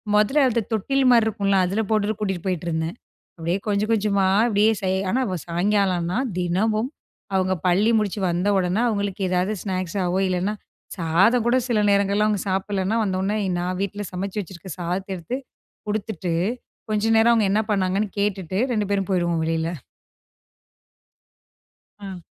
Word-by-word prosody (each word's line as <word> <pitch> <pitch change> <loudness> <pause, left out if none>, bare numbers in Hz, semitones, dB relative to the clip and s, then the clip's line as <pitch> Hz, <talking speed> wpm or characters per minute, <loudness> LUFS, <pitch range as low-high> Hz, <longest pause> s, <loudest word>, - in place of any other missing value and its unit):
மொதல்ல 265 +8 +4
அந்த 235 -1 +1
தொட்டில் 270 +5 +1
மாரி 230 -2 +5
இருக்கும்ல, 200 -2 +1
அதில 195 +5 0
போட்டுட்டு 215 -1 +1
கூட்டிட்டு 190 -4 -3
போயிட்டுருந்தேன். 165 -1 -2 0.4
அப்டியே 170 +3 -1
கொஞ்ச, 205 0 +1
கொஞ்சமா 200 -3 +2 0.2
அப்டியே 215 0 +3
செய் 190 0 0
ஆனா, 260 - +1 0.3
சாயங்காலனா 180 0 +1 0.2
தினமும் 215 +7 0 0.4
அவுங்க 185 0 +2
பள்ளி 195 +5 +3
முடுச்சு 210 -1 -2
வந்த 175 +4 0
உடனே, 185 +2 +1
அவுங்களுக்கு 200 -3 -1
ஏதாவது 180 +3 +1
ஸ்நாக்ஸாவோ, 185 -1 -1
இல்லனா 185 +3 -1 0.4
சாதம் 190 +8 +3
கூட 240 +2 +3
சில 230 - +2
நேரங்கள்ல 200 +1 +2
அவுங்க 210 -3 0
சாப்பிடலன்னா 195 +2 -1
வந்தோனே, 195 +2 -1 0.2
நான் 180 +1 -2
வீட்ல் 205 0 -4
சமைச்சு 195 +3 -4
வச்சுருக்க 185 0 -9
சாதத்தை 185 +3 -3
எடுத்து 175 +9 -4 0.5
குடுத்துட்டு, 200 -4 -2 0.6
கொஞ்சம் 215 +1 +2
நேரம் 235 +1 +5
அவுங்க 215 -4 +2
என்ன 215 +2 +3
பண்ணாங்கன்னு 195 +1 0
கேட்டுட்டு, 190 -2 -1
2 210 -3 0
பேரும் 195 -2 0
போயிடுவோம் 170 -3 +1
வெளியில. 165 +1 -1 2.2
அ. 190 -4 -8
195 Hz, 135 wpm, -23 LUFS, 180-210 Hz, 2.2 s, மாரி